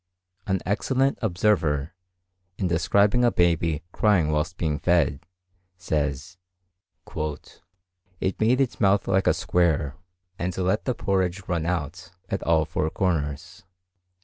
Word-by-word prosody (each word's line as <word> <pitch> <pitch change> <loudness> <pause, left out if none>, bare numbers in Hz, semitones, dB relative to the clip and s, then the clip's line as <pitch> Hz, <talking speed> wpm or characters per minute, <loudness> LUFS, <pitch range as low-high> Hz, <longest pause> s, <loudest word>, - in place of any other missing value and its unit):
An 95 -2 0
excellent 130 +7 0
observer, 85 - +1 0.6
in 95 - 0
describing 100 +7 +2
a 120 - +4
baby 85 -4 +1
crying 95 -9 +2
whilst 80 +3 -1
being 75 -3 -1
fed, 85 -6 +2 0.6
says, 75 -1 -2 1.8
"it 95 - -2
made 120 +4 +3
its 135 -3 0
mouth 100 -1 +3
like 95 0 +2
a - - +5
square, 80 -5 +1 0.4
and 90 0 -3
let 95 +3 0
the 125 - 0
porridge 95 -1 -1
run 85 -2 -1
out 85 +1 -3 0.2
at - - -2
all 80 -1 +2
four 80 0 -1
corners." 85 +1 -2
90 Hz, 120 wpm, -25 LUFS, 80-100 Hz, 1.8 s, a